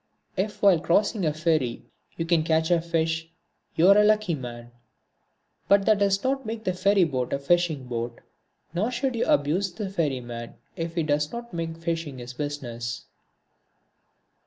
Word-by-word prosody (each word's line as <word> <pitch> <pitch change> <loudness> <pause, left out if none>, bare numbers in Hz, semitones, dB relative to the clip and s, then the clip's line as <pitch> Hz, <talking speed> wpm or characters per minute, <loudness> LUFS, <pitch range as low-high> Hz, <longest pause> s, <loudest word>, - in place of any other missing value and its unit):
If 205 +3 -3
while 195 -5 +6
crossing 195 +2 +1
a - - +2
ferry 155 -6 0 0.3
you 165 - -1
can 165 -1 +3
catch 160 +1 +1
a 170 -1 +4
fish 165 -1 -1 0.5
you 170 - +4
are 200 +1 +8
a - - +6
lucky 210 -3 +3
man, 120 -4 -7 1.0
but 200 0 +4
that 215 -2 +4
does 200 -1 +2
not 270 +1 0
make 225 -1 -5
the 185 - 0
ferry 195 +1 +3
boat 130 -6 -1
a - - +1
fishing 155 -1 +1
boat, 120 -1 -4 0.5
nor 195 +7 0
should 255 +1 -1
you 230 - 0
abuse 175 +7 +2
the 195 +1 -5
ferryman 125 -9 -3 0.2
if 165 -2 -4
he 165 - +1
does 150 0 0
not 235 -2 -7
make 165 -1 -4
fishing 165 -4 -3
his 125 0 -8
business. 120 -5 -5
165 Hz, 165 wpm, -26 LUFS, 145-195 Hz, 1.0 s, are